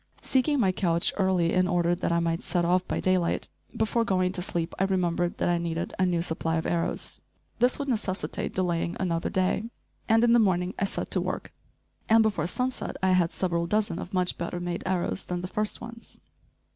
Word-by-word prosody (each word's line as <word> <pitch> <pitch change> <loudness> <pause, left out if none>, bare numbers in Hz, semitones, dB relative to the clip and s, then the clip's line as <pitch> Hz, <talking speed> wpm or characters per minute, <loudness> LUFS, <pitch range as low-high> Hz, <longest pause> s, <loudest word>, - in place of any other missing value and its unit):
Seeking 275 +2 +2
my 195 -6 +3
couch 170 -3 +1
early 185 -4 +2
in 185 0 +3
order 175 -1 +2
that 175 -1 -1
I 170 - +3
might 165 0 0
set 175 -2 0
off 180 +1 +2
by - - -1
daylight, 185 -2 +1 0.3
before 225 +1 +1
going 185 -4 +1
to 185 -1 -3
sleep 170 -1 -2
I 195 - +3
remembered 175 -2 0
that - - 0
I 175 -1 +2
needed 170 0 -3
a 185 - +3
new 170 -2 +1
supply 165 -1 -2
of 160 - -1
arrows. 170 -1 -2 0.4
This 245 +1 +4
would 280 - -4
necessitate 210 -6 -2
delaying 170 -2 0
another 170 -3 -1
day, 190 +4 0 0.4
and 225 +1 +5
in 235 -1 +5
the 240 - +6
morning 185 -3 +2
I 195 - +2
set - - -3
to - - +2
work, - - -4 0.6
and 225 0 +6
before 185 -7 0
sunset 250 +7 -2
I 190 - +4
had 180 -2 +3
several 170 -2 -1
dozen 205 -3 0
of 185 - -7
much 180 -2 0
better 175 +1 -3
made 175 0 -3
arrows 185 0 -1
than 175 -1 -3
the - - -2
first 210 +3 -2
ones. 235 0 -10
185 Hz, 205 wpm, -27 LUFS, 170-200 Hz, 0.6 s, the